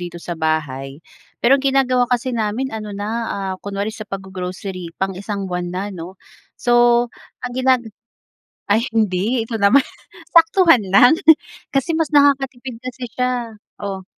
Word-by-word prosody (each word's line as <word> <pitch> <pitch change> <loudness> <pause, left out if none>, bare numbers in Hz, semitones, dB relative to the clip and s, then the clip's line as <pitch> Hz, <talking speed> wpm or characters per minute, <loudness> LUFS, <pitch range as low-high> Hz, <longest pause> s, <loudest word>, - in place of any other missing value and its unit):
dito 175 -1 -6
sa 175 0 -6
bahay. 150 -3 -3 0.4
Pero 270 +3 +5
ginagawa 265 -2 +2
kasi 250 +1 0
namin 230 +3 -2
ano 215 -1 -5
na, 205 +1 -4 0.4
ah, - - -3
kunwari 200 +2 -4
sa 215 -1 -9
paggo-grocery 185 -2 -6
pang 190 0 -1
1 200 +1 -5
buwan 180 -1 -3
na 190 +3 -4
'no. 180 +2 -8 0.4
So, 240 0 +4 0.4
ang 250 - -4
ginag 255 -1 +2 0.9
ay 230 +5 +1
hindi, 215 +3 +1
ito 225 -1 -5
naman 225 +7 +5 0.5
saktuhan 330 - +6
lang 200 +8 +7 0.6
kasi 275 +4 0
mas 320 -1 0
nakakatipid 270 -4 +1
kasi 255 0 -7
siya 250 -2 -2 0.2
oh? 195 -2 -5
225 Hz, 140 wpm, -19 LUFS, 190-255 Hz, 0.9 s, lang